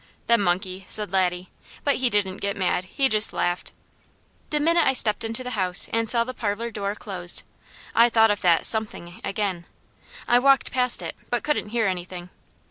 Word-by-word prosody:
"The 235 - +3
monkey!" 185 0 -2
said 210 -4 0
Laddie, 180 -1 -1 0.3
but 285 -2 +1
he 255 -1 0
didn't 200 -3 -2
get 200 0 -4
mad; 185 -1 -1
he 270 +8 0
just 215 -3 +3
laughed. 175 0 -3 0.8
The 300 - -1
minute 335 +2 +2
I 265 - +3
stepped 220 -4 +2
into 225 +3 -4
the 250 - -6
house 185 -5 +5
and 230 -1 0
saw 235 -1 +4
the 255 +2 -7
parlour 230 +1 -4
door 200 -1 -4
closed, 180 -5 -1 0.5
I 235 +1 +4
thought 225 -1 +3
of 205 - -3
that 170 -3 +2
"something" 210 -5 +1
again. 195 -4 -4 0.6
I 245 - +4
walked 275 +1 +2
past 250 -2 +3
it, - - -6
but 240 - -2
couldn't 300 -8 -2
hear 230 0 -1
anything. 180 -1 -5
210 Hz, 185 wpm, -23 LUFS, 185-235 Hz, 0.8 s, house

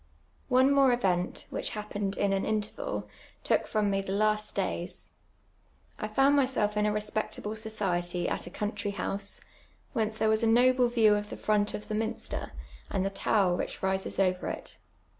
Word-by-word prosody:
One 260 +2 +5
more 275 -2 +5
event, 185 -7 0
which - - -2
hapjuned 205 -2 -3
in 200 -1 +2
an 195 - 0
intenal, 220 - -2 0.4
took - - +1
from 210 -2 +1
me 195 0 +1
the 195 - -5
last 215 +1 +1
days. 180 -2 -3 0.9
I 215 - -2
found 270 +6 +4
myself 255 -7 +2
in 210 0 +2
a - - +2
respectable 210 0 -2
society 180 -5 -1
at - - -2
a - - -5
country 205 +1 -3
hous(% 200 0 -3 0.5
whence 220 -3 0
there 220 0 +1
was 220 +1 +3
a 230 - +3
iu*ble 250 +2 +5
view 225 -3 +4
of 210 0 -1
the - - -6
front 210 -1 +1
of 210 - -7
the - - -4
minster, 220 +1 -3 0.4
and 190 - 0
the 195 - -1
tower 195 -2 +2
which - - -4
rises 190 0 0
over 185 -2 +1
it. - - -6
210 Hz, 175 wpm, -29 LUFS, 195-220 Hz, 0.9 s, One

